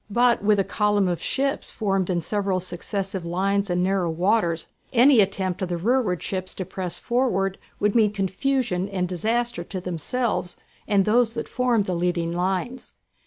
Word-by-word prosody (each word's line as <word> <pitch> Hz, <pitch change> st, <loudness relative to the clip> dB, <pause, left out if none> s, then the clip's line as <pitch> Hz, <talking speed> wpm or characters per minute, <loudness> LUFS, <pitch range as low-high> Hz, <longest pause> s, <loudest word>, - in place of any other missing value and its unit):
But 240 Hz, +1 st, +3 dB
with 210 Hz, 0 st, +4 dB
a 195 Hz, -, +3 dB
column 205 Hz, -1 st, +1 dB
of 175 Hz, -2 st, -2 dB
ships 275 Hz, +1 st, -1 dB
formed 195 Hz, -4 st, -1 dB
in 175 Hz, -2 st, 0 dB
several 195 Hz, 0 st, -1 dB
successive 190 Hz, +1 st, -4 dB
lines 195 Hz, +3 st, 0 dB
in 180 Hz, 0 st, +1 dB
narrow 190 Hz, -2 st, +1 dB
waters 170 Hz, -1 st, +1 dB, 0.3 s
any 255 Hz, +1 st, +6 dB
attempt 190 Hz, -2 st, 0 dB
of 185 Hz, -, -2 dB
the 175 Hz, -, -1 dB
rearward 210 Hz, -2 st, +1 dB
ships 185 Hz, -1 st, -4 dB
to 185 Hz, -, -4 dB
press 180 Hz, -1 st, -4 dB
forward 230 Hz, -6 st, 0 dB, 0.2 s
would 210 Hz, 0 st, +2 dB
mean 220 Hz, -3 st, +4 dB
confusion 200 Hz, 0 st, -1 dB
and 185 Hz, -2 st, -1 dB
disaster 225 Hz, +3 st, -1 dB
to 185 Hz, -, -5 dB
themselves 180 Hz, +3 st, -2 dB, 0.3 s
and 200 Hz, -2 st, +3 dB
those 230 Hz, +1 st, +3 dB
that 230 Hz, -, -4 dB
formed 245 Hz, -5 st, +1 dB
the 185 Hz, -, -2 dB
leading 170 Hz, -1 st, 0 dB
lines. 190 Hz, +8 st, -2 dB
195 Hz, 165 wpm, -24 LUFS, 180-225 Hz, 0.3 s, any